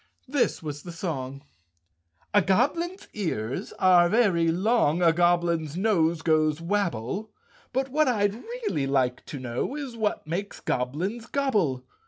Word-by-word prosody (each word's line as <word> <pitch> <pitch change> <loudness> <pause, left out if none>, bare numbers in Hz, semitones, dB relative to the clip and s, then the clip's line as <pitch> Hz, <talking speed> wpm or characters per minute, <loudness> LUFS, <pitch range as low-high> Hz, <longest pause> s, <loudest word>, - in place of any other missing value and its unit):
This 270 - 0
was 145 -2 -5
the 175 - -8
song: 140 -6 -5 0.4
" 85 0 -42
A 205 - +6
goblin's 295 - 0
ears 135 - -3
are 180 -2 +5
very 195 -7 +3
long, 180 -3 +2
A 165 -1 +5
goblin's 170 -2 +1
nose 170 -6 +2
goes 155 -1 +2
wabble, 195 - -2 0.4
But 265 +1 -1
what 305 +3 +2
I'd 205 -5 +2
really 420 - -3
like 130 -2 +1
to 145 - -6
know 130 - -3
Is 280 -5 -5
what 215 -6 -1
makes 180 +6 -4
goblins 175 - -2
gobble? 205 - 0
175 Hz, 140 wpm, -26 LUFS, 150-220 Hz, 0.4 s, A